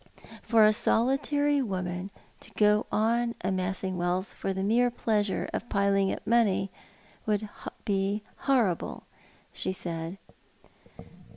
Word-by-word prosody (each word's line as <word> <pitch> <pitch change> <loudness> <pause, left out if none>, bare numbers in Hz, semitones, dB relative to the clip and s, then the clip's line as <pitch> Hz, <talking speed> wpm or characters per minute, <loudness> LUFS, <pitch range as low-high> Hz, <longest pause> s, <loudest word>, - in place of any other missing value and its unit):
" - - -18
For 225 -2 +5
a 215 - +5
solitary 285 +6 +2
woman 185 -4 -3 0.3
to - - -11
go 210 0 +3
on 235 +2 +1
amassing 185 0 -1
wealth 175 +2 0
for 195 - -4
the 190 0 -2
mere 235 +5 +3
i>leasnre 215 -4 0
of - - -2
veiling 195 -1 +2
up - - -5
money 210 -4 +2 0.6
would 210 0 0 0.4
Iv 200 +1 0 0.2
horrible," 235 -10 0 0.5
she - - -3
said. 170 -1 -5
205 Hz, 120 wpm, -28 LUFS, 190-230 Hz, 0.6 s, For